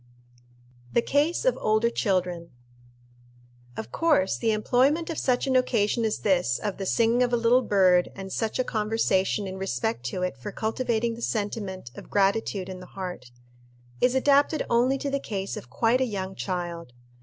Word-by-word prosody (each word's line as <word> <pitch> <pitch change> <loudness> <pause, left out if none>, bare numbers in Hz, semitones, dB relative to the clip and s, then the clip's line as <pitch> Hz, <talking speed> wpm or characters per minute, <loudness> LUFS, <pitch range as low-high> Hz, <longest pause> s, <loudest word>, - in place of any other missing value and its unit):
The 235 - +3
Case 300 - +1
of - - +2
older 215 +2 +2
Children. 180 -6 -1 1.3
Of 110 +2 -6
course 300 - +2
the 230 - -1
employment 265 +10 +2
of 325 - -3
such 250 -2 +1
an 265 -1 0
occasion 230 -3 +2
as 220 - 0
this 180 - +2
of 205 -2 -4
the 195 -1 -4
singing 230 +3 +2
of 245 -1 +2
a 240 - +3
little 235 +2 +4
bird 185 -5 +3
and 195 -1 -7
such 225 -2 -1
a 255 - +2
conversation 210 -3 0
in 190 0 -6
respect 120 -8 -2
to 180 +9 -3
it 180 -7 -2
for 125 - -7
cultivating 230 0 -1
the 230 - -9
sentiment 205 - -3
of - - -11
gratitude 200 -1 +1
in 185 -1 -7
the 180 - -11
heart, 180 -10 -6 0.7
is 250 +1 +3
adapted 285 +3 +3
only 250 +3 +3
to 280 +1 -3
the 280 - 0
case 195 -6 -4
of 125 - -9
quite 230 - +2
a - - +3
young 195 -4 -4
child. 175 -7 -4
215 Hz, 175 wpm, -26 LUFS, 185-245 Hz, 1.3 s, little